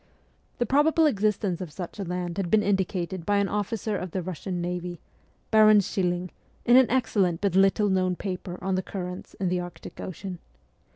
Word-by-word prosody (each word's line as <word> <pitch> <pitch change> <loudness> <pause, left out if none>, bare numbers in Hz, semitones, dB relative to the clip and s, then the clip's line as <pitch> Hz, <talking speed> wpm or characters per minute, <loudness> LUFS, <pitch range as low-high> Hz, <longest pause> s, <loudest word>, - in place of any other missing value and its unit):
The 240 - +1
probable 305 +6 +4
existence 210 - +1
of 175 -4 -6
such 180 +5 -7
a - - -1
land 180 0 -4
had 190 -3 -1
been 215 +1 +4
indicated 190 -2 -1
by 205 +3 +1
an 200 0 +2
officer 210 +1 -2
of 185 -1 -4
the 185 +2 -3
Russian 180 +1 -4
navy, 175 0 -4 0.5
Baron 215 -1 +7
Schilling, 180 -2 -1 0.3
in 240 - +6
an 260 -1 +7
excellent 210 -9 +1
but 200 -3 0
little 195 +2 +4
known 185 -2 +1
paper 185 -1 -5
on 190 0 0
the 185 - +1
currents 180 -1 -6
in 190 -2 -1
the 180 0 0
Arctic 175 0 -8
Ocean. 185 0 -6
190 Hz, 180 wpm, -26 LUFS, 180-210 Hz, 0.5 s, Baron